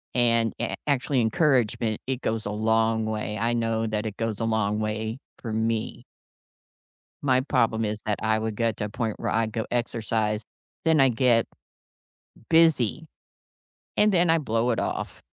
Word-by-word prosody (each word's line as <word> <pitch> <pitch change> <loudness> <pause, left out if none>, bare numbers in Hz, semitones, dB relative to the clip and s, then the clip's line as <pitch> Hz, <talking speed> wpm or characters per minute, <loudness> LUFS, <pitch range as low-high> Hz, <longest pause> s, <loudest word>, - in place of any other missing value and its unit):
and 115 -2 +2
a 120 - -2
actually 140 -1 +1
encouragement, 115 -3 +1
it 130 -1 -2
goes 110 -1 -2
a 105 - -2
long 110 +1 +1
way, 105 -1 -3
I 115 +2 +1
know 115 -1 0
that 110 0 -2
it 105 -2 -4
goes 115 -2 -2
a 115 - 0
long 110 -2 0
way 110 +2 -3 0.2
for 115 - -5
me. 110 0 -1 1.2
My 130 -3 +3
problem 115 -5 +1
is 105 0 -3
that 105 -1 -1
I 110 0 +2
would 110 -1 -3
get 115 -1 0
to 105 - -2
a - - -5
point 110 0 -3
where - - -2
I'd 110 0 +1
go 110 0 -2
exercise, 110 -3 -1 0.4
then 160 -2 +3
I 135 -1 +6
get 120 -1 +3 1.0
busy, 160 -3 +3 0.9
and 210 0 +5
then 175 -1 +3
I 165 - +5
blow 115 -5 0
it 115 - 0
off. - - -4
115 Hz, 170 wpm, -26 LUFS, 110-125 Hz, 1.2 s, I